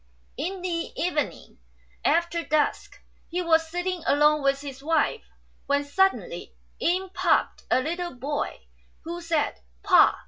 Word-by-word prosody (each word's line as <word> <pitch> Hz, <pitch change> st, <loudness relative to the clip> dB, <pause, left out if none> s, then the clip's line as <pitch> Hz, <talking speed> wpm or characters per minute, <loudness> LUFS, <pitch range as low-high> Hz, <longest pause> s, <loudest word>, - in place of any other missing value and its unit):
In 370 Hz, +3 st, -4 dB
the 340 Hz, -2 st, -2 dB
evening, 330 Hz, -4 st, -2 dB, 0.4 s
after 340 Hz, 0 st, +2 dB
dusk, 305 Hz, -2 st, 0 dB, 0.3 s
he 360 Hz, +2 st, -1 dB
was 325 Hz, -1 st, +3 dB
sitting 355 Hz, +1 st, -2 dB
alone 300 Hz, +1 st, +4 dB
with 275 Hz, 0 st, +1 dB
his 275 Hz, -2 st, -8 dB
wife, 325 Hz, +8 st, +1 dB, 0.5 s
when 285 Hz, 0 st, +2 dB
suddenly 385 Hz, +11 st, 0 dB, 0.2 s
in 370 Hz, +2 st, +1 dB
popped -, -, +1 dB
a 255 Hz, -, +4 dB
little 345 Hz, +1 st, -3 dB
boy, 285 Hz, +4 st, -3 dB, 0.4 s
who 340 Hz, +2 st, -5 dB
said, 330 Hz, -3 st, 0 dB
" -, -, -36 dB
Pa -, -, +6 dB
330 Hz, 135 wpm, -26 LUFS, 290-355 Hz, 0.5 s, Pa